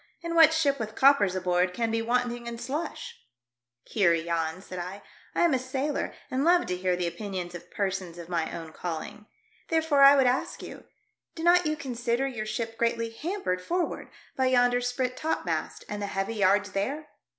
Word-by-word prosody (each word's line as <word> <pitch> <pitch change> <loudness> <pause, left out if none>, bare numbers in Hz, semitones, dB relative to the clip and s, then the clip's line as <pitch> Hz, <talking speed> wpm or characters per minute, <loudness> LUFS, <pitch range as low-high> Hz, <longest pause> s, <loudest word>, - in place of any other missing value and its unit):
And 335 0 -3
what 325 -2 +7
ship 290 -4 +1
with 220 -1 -5
coppers 265 -9 +5
aboard 180 0 +1
can 230 -1 0
be 225 0 0
wanting 240 0 -1
in 235 0 -5
slush 280 +7 -5 0.2
?" 120 0 -64
" 120 0 -63
Heer 180 -6 +4
Jans," 165 +2 -2
said 185 - -7
I, 185 +3 -6 0.2
" - - -28
I - - +2
am 340 -4 +4
a 260 - +2
sailor 265 +3 -2 0.2
and 260 +2 0
love 350 +2 +4
to 180 - -2
hear 180 0 0
the 175 0 -2
opinions 175 0 -4
of 175 - -10
persons 190 -4 -3
of 170 -1 -8
my 170 -2 -1
own 165 -1 -7
calling. 175 +5 -6 0.4
Therefore 320 -3 +2
I 275 +1 +9
would 270 -2 +4
ask 250 +1 0
you, - - -10 0.5
do 325 - -6
not 350 -1 +5
you 305 - 0
consider 245 -2 -1
your 220 -5 -4
ship 225 +1 -4
greatly 230 -1 0
hampered 285 - -3
forward 350 - -2 0.3
by 260 -1 +2
yonder 245 -1 +3
sprit 250 +1 -1
topmast 315 +4 -2
and 210 0 -5
the 205 - -2
heavy 195 +3 -2
yards 200 -1 +2
there 275 +11 -2
230 Hz, 195 wpm, -27 LUFS, 185-270 Hz, 0.5 s, I